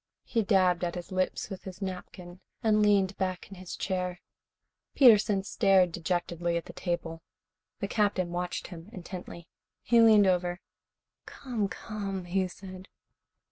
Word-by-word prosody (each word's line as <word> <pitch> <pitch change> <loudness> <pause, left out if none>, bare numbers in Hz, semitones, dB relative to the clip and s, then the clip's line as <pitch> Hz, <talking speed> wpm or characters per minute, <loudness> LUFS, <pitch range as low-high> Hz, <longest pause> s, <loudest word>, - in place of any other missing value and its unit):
He 230 - 0
dabbed 185 -4 +3
at 175 0 -2
his 175 +1 -7
lips 185 +2 -1
with 190 - -7
his 190 -1 -8
napkin 185 -2 -7 0.2
and 215 -1 +3
leaned 200 -2 +3
back 185 -1 -2
in 195 - -10
his 185 -1 -7
chair. 180 -2 -2 0.8
Peterson 215 -6 +6
stared 195 -3 +3
dejectedly 175 0 -1
at 170 - -4
the - - -10
table. 165 -2 -3 0.6
The 200 - -1
Captain 200 -4 0
watched 175 0 -3
him 170 -3 -10
intently. 175 -2 -9 0.4
He 235 -1 +5
leaned 215 -3 +7
over. 180 -1 +1 0.7
"Come, 235 -7 -3
come," 195 -3 -5
he 185 +1 0
said. 185 +1 -11
185 Hz, 140 wpm, -29 LUFS, 175-200 Hz, 0.8 s, leaned